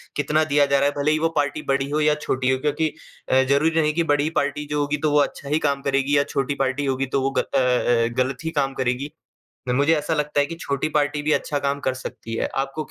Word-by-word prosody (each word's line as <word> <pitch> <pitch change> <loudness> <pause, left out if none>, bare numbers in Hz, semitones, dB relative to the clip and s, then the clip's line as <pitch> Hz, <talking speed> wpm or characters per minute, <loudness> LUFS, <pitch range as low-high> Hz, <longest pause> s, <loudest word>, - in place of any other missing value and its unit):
कितना 150 +2 +1
दिया 145 -1 +3
जा 140 0 +2
रहा 140 - +2
है, - - -4
भले 150 +2 +2
ही 155 - +1
वो 165 +1 +1
पार्टी 145 +1 0
बड़ी 135 0 0
हो 150 +1 0
या 150 0 +3
छोटी 130 -3 -1
हो 130 - +1
क्योंकि 150 +3 0 0.4
अ, 130 - +5
जरूरी 155 +5 +2
नहीं 155 0 +1
कि 170 +2 +1
बड़ी 145 +1 +1
पार्टी 145 +1 -2
जो 150 - 0
होगी 145 +1 -1
तो 150 - +2
वो 150 - +4
अच्छा 140 0 -2
ही 150 +2 +2
काम 140 -1 -1
करेगी 140 +1 +1
या 140 - +4
छोटी 140 +1 0
पार्टी 135 +2 -1
होगी 135 0 0
तो 135 - +2
वो 135 +1 0
ग - - +5
अ - - +1
अ 125 -2 +2
अ, - - +1
गलत 130 0 0
ही 160 - -2
काम 135 -1 0
करेगी। 130 +2 -2 0.6
मुझे 140 +6 +3
ऐसा 150 +1 -1
लगता 150 -1 0
है 145 - +3
कि 165 +3 -7
छोटी 140 +1 -2
पार्टी 145 -1 0
भी 155 - +1
अच्छा 145 -1 0
काम 140 0 -1
कर 130 -2 -1
सकती 120 -3 -7
है। - - -1
आपको 135 +3 -2
145 Hz, 265 wpm, -23 LUFS, 135-150 Hz, 0.6 s, अ